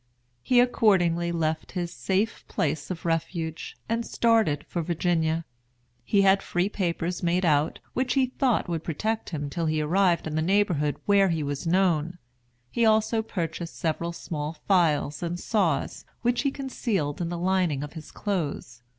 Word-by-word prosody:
He 250 - +3
accordingly 175 -8 +3
left 160 -2 -2
his 175 -2 -3
safe 200 +4 -1
place 150 0 -2
of 175 -3 -5
refuge, 165 0 -2
and 230 +1 0
started 225 -13 +2
for 175 - -3
Virginia. 165 -1 0 0.6
He 200 - +3
had 195 0 +5
free 180 +2 0
papers 175 -3 -2
made 180 +1 +1
out, 150 -1 +2 0.2
which 255 +1 0
he 270 -1 +4
thought 255 -3 0
would 165 -2 -3
protect 215 +8 -2
him 150 -4 -3
till 165 +3 -2
he 155 0 +1
arrived 175 +2 +2
in 155 - -4
the 155 - +1
neighborhood 175 -5 +2
where 200 -1 +4
he 165 -3 0
was 145 +3 -3
known. 175 -2 +2 0.5
He 235 - +1
also 220 0 +3
purchased 170 -5 -4
several 170 +1 -1
small 155 -2 -4
files 155 -6 +2
and 175 0 -3
saws, 185 - 0 0.2
which 240 0 +2
he 275 - +1
concealed 230 - -2
in 170 - -1
the 175 - -3
lining 175 -5 +1
of 145 - -7
his 160 -2 -9
clothes. 150 - -3
175 Hz, 160 wpm, -26 LUFS, 160-200 Hz, 0.6 s, had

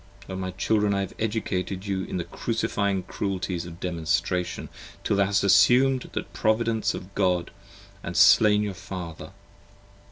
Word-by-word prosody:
O 95 - -5
my 95 0 -3
Children, 105 +2 +1
55 - - 0
I - - +1
have 95 - -5 0.2
educated 95 -3 -3
you 95 -2 -2
in - - -4
the 90 - -2
crucifying 100 +2 -1
cruelties 95 -3 -3
of 85 0 -10
Demonstration 85 +1 -1 0.3
Till 100 - +1
you 100 - +4
have 100 0 +1
assum'd 125 +7 +4
the - - -2
Providence 110 0 0
of 95 +2 -9
God 90 -3 0 0.4
& - - -9
slain 105 -1 +6
your 105 -2 -3
Father. 90 -4 -7
95 Hz, 155 wpm, -25 LUFS, 90-105 Hz, 0.4 s, slain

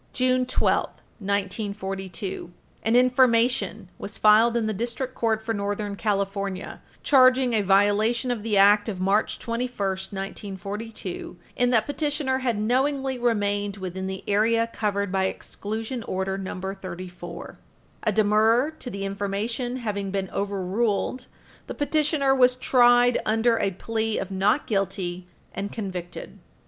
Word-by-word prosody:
June 255 0 +2
12, 255 - +2 0.3
1942, 195 -2 -3 0.3
an 225 +1 +1
Information 250 0 +3
was - - -6
filed 220 +2 +5
in 230 - 0
the 215 - -1
District 240 +4 -3
Court 220 -2 0
for 225 0 -2
Northern 205 0 -3
California 200 -2 -2 0.2
charging 255 -2 +5
a 220 - +3
violation 205 +5 +2
of 235 -3 -2
the 210 -1 0
Act 205 +2 +5
of 190 -4 -5
March 195 +3 +1
21, 235 +2 -3
1942, 195 +1 -5 0.2
in 245 0 +2
that 225 -3 +3
petitioner 290 -2 -1
had 245 -4 -1
knowingly 265 +4 0
remained 205 -3 0
within 190 0 -5
the 190 0 -5
area 230 +3 +2
covered 200 -2 -1
by 190 0 +1
Exclusion 220 +5 -4
Order 190 -2 -2
No. 190 -1 -5
34. 185 -2 -7 0.4
A 215 - +1
demurrer 220 +6 +3
to 250 - -6
the 195 -3 -4
information 205 +5 -3
having 205 -5 -3
been 190 -1 -3
overruled, 200 +5 -1 0.4
the - - -6
petitioner 295 -2 +2
was 250 -1 +4
tried 245 -1 +4
under 225 +1 +2
a 195 - +1
plea 220 +3 -2
of 195 - -4
not 200 +8 +2
guilty, 190 -3 -2 0.3
and 200 +1 -4
convicted. 185 -5 -6
210 Hz, 135 wpm, -25 LUFS, 195-240 Hz, 0.4 s, filed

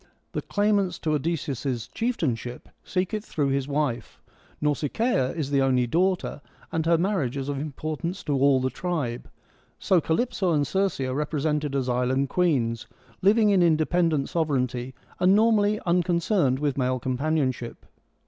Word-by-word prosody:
The - - -3
claimants 205 -3 +1
to 155 - -2
Odysseus' 140 -6 -2
chieftainship 130 - -3
seek 185 +2 -2
it 215 -1 -2
through 145 -8 -1
his 135 0 0
wife; 140 -5 -2 0.4
Nausicaa 150 - 0
is 145 -4 -3
the 140 -1 +3
only 130 -2 +2
daughter, 180 +3 0 0.3
and 160 0 -1
her 170 0 +4
marriage 170 - 0
is 135 +1 -3
of 140 -1 -2
importance 155 +5 -4
to 145 - -1
all 135 0 +4
the 130 0 -1
tribe. 150 -10 -3 0.5
So 185 -3 +2
Calyp 240 +12 0
so 185 -7 +1
and 145 -2 +2
Circe 195 -2 0
are 130 -1 -1
represented 150 0 -1
as 130 -2 0
island 125 +2 +1
queens, 125 -11 0 0.3
living 210 +2 +4
in 190 -2 +4
independent 160 -2 +2
sovereignty, 130 -6 -1 0.2
and 185 +2 +5
normally 215 -1 +3
uncon 175 0 +2
cerned 170 - +1
with 140 -1 -1
male 130 0 +1
companionship. 130 -1 -2
150 Hz, 150 wpm, -25 LUFS, 130-180 Hz, 0.5 s, and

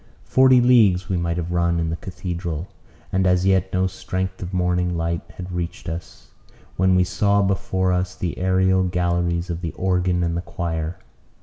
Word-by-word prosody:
Forty 130 -1 +5
leagues 105 -7 +4
we 95 - 0
might 85 0 -1
have 85 0 -3
run 85 -1 +1
in 80 -1 -1
the - - -1
cathedral, 90 -1 -5 0.4
and 95 0 +2
as 90 0 +2
yet 95 -1 +2
no 95 0 +1
strength 95 0 -4
of 90 -1 -5
morning 90 -1 0
light 85 0 -1
had 90 0 -7
reached 85 -1 -4
us, 80 0 -7 0.4
when 95 0 +3
we 90 - +4
saw 100 +2 +2
before 95 -1 0
us 90 0 -1
the 90 - -3
aërial 95 0 +2
galleries 85 0 0
of 85 0 -4
the 85 -4 -4
organ 90 -1 0
and 85 -1 -1
the 85 - -1
choir. 85 -1 -4
90 Hz, 180 wpm, -22 LUFS, 85-95 Hz, 0.4 s, Forty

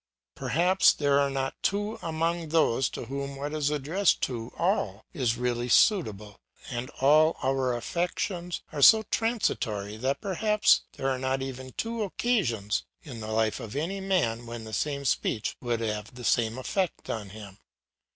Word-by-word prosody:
Perhaps 180 +5 +3
there 140 -1 +2
are 140 0 +2
not 135 -1 -2
two 205 +3 -1
among 165 0 -1
those 150 -5 +2
to - - -6
whom 140 +2 -5
what 145 +2 -5
is 150 -2 +1
addressed 150 +7 +1
to 120 -2 -3
all 110 - 0
is 120 -4 0
really 120 0 -1
suitable; 105 - +2 0.3
and 120 +1 -4
all 155 +4 +5
our 130 -2 +1
affections 175 - -2
are 145 - -4
so 220 +9 +8
transitory 110 - -1
that 130 +4 -1
perhaps 210 +2 +3
there 135 - -3
are 130 - -2
not 130 +1 -1
even 130 -1 -7
two 230 0 -3
occasions 180 - 0 0.2
in 125 -7 -8
the 110 - -6
life 110 -1 +1
of 110 - -8
any 170 +7 -2
man 120 -12 0
when 115 -1 -6
the 110 0 -9
same 140 +1 -2
speech 110 -4 0
would 120 -2 -1
have 105 0 -3
the 125 - -9
same 115 0 +2
effect 185 +8 -2
on 105 -3 -5
him. 100 -1 -11
135 Hz, 160 wpm, -28 LUFS, 115-170 Hz, 0.3 s, so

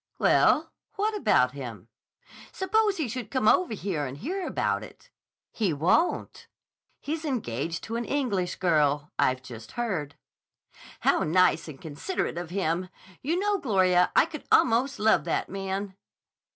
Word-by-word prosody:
"Well, - - +3 0.2
what 430 +1 0
about 125 - +3
him?" 120 -7 -8 0.6
"Suppose 420 +1 +1
he 310 -6 -1
should 235 -2 -5
come 260 -5 0
over 345 -2 +4
here 175 -7 -2
and 130 +2 -7
hear 360 - -3
about - - 0
it?" - - -14 0.4
"He 200 -7 0
won't. 170 - 0 0.5
He's 315 +2 -4
engaged 165 - -3
to 230 +1 -4
an 235 - -3
English 210 -11 -1
girl. 150 -4 +1
I've 130 0 +2
just 115 -3 -10
heard." 180 -12 -3 0.9
"How - - +3
nice 170 0 +3
and 145 -4 -9
considerate 165 - -3
of 175 -2 -6
him! 180 -1 -1 0.3
You 320 +6 0
know, 405 +1 +1
Gloria, 185 - +3
I - - +6
could 320 -3 -9
almost 250 +4 +3
love 220 +1 +3
that - - -1
man." 195 0 -4
195 Hz, 145 wpm, -27 LUFS, -, 0.9 s, I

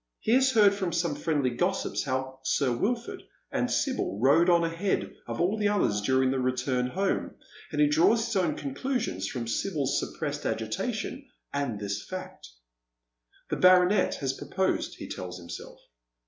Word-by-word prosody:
Ho 220 - +2
has 260 +1 +4
heard 210 -3 +6
fi'om 195 -3 -2
some 170 -3 0
fiiendly 140 -7 0
gossips 190 +7 0
how 130 0 -3
Sir 130 -2 +1
Wilford 235 - -2 0.3
and - - 0
Sibyl 255 - -1
rode 150 +8 +5
on 170 -1 +5
ahead 165 +4 -1
of - - -4
all 195 +6 +1
the 205 - +2
others 190 - +1
during 130 +4 +2
the 135 - 0
return 125 0 0
home, 190 +8 -1 0.4
and - - -3
he 300 - +6
draws 300 -7 +4
his 230 -2 -3
own 175 -6 +1
conclusions 140 - -2
from 120 0 -4
Sibyl's 140 0 0
suppressed 145 -2 -4
agitation 220 - -3 0.2
and 140 -7 -2
this 100 0 -3
fact. 185 - -8 1.0
The - - 0
baronet 185 +2 +5
has 135 -2 -2
proposed, 190 +7 -1
he - - -8
tells 90 -1 -6
himself. 85 -1 -9
160 Hz, 160 wpm, -28 LUFS, 130-200 Hz, 1.0 s, heard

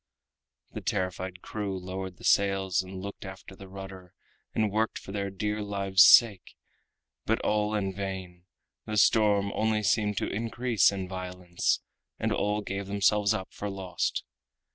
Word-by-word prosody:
The - - -6
terrified 90 0 -3
crew 100 -3 -4
lowered 95 0 -6
the - - -16
sails 95 -2 +2
and 95 0 -8
looked 100 +1 -7
after 95 0 -10
the 95 0 -12
rudder, 95 -1 -10 0.4
and 110 -2 +1
worked 110 +2 0
for - - -9
their 100 -1 -2
dear 105 +2 -2
lives' 100 -2 +2
sake, 105 -6 +6 0.7
but - - +2
all 105 0 +1
in 95 -2 -1
vain—the 95 +2 -7
storm 105 -2 +4
only 110 -1 +1
seemed 105 0 +1
to - - 0
increase 115 -1 +1
in 95 -2 -4
violence, 90 -1 -2 0.4
and - - -1
all 105 +1 0
gave 100 0 -4
themselves 100 +1 +2
up 95 - -5
for 105 - -4
lost. 95 -3 -2
100 Hz, 145 wpm, -28 LUFS, 95-105 Hz, 0.7 s, sake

